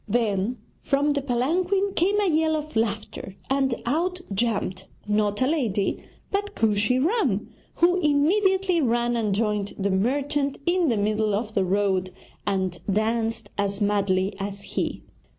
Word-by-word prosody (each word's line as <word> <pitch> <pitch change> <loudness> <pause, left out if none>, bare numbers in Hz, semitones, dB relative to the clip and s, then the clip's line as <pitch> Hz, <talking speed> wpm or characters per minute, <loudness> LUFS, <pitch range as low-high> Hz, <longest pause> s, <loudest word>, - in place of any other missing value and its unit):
Then 215 0 0 0.2
from 285 +1 +1
the 285 - -1
palanquin 355 +10 0
came 395 +4 +2
a 410 - +2
yell 315 -1 +2
of 305 -3 -5
laughter, 215 -3 -2 0.2
and 270 -2 +2
out 345 +8 0
jumped 195 -3 -1 0.2
not 210 +2 +1
a - - +2
lady 235 -11 0 0.3
but 410 +1 -2
Kooshy 215 +2 +2
Ram, 260 - +1 0.2
who 355 +2 +3
immediately 360 +4 +2
ran 240 -2 +1
and 215 -4 0
joined 210 -2 -1
the 200 0 0
merchant 275 +7 0
in 345 -2 +2
the 230 - +1
middle 210 0 +1
of 215 +1 -3
the 195 - +2
road 190 -1 +1 0.4
and 190 -3 -1
danced 225 +2 -1
as 200 0 0
madly 200 -2 +1
as 200 0 -5
he. - - -3
235 Hz, 145 wpm, -25 LUFS, 205-305 Hz, 0.4 s, who